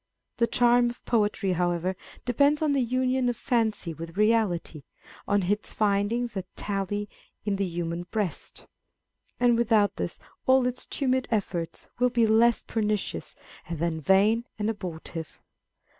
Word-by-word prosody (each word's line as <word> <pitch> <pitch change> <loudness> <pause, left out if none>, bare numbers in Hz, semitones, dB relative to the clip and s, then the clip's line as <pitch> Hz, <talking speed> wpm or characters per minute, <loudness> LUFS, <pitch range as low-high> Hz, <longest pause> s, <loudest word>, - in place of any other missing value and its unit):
The 235 - +3
charm 240 0 +4
of 240 - -10
poetry, 210 -4 +1
however, 175 +1 0 0.3
depends 285 +5 +3
on 300 -2 +2
the 275 - +2
union 255 +1 +1
of 240 - -2
fancy 220 -8 0
with 165 +2 -9
reality, 210 -8 +1 0.5
on 205 -1 +2
its 205 +4 -1
finding 210 +3 +1
a 190 - -1
tally 205 +1 -2 0.4
in 200 -2 0
the 195 -1 0
human 170 0 -4
breast; 210 -6 -4 0.7
and 240 -1 +4
without 220 -3 +2
this - - -3 0.3
all 260 -1 +5
its 250 0 -2
tumid 260 -2 0
efforts 190 -6 -2
will 250 0 +4
be 235 -2 +3
less 225 +2 +4
pernicious 215 -2 -2 0.3
than 165 -1 -2
vain 205 - +3
and 215 +1 0
abortive. 170 -5 -7
210 Hz, 140 wpm, -27 LUFS, 185-240 Hz, 0.7 s, all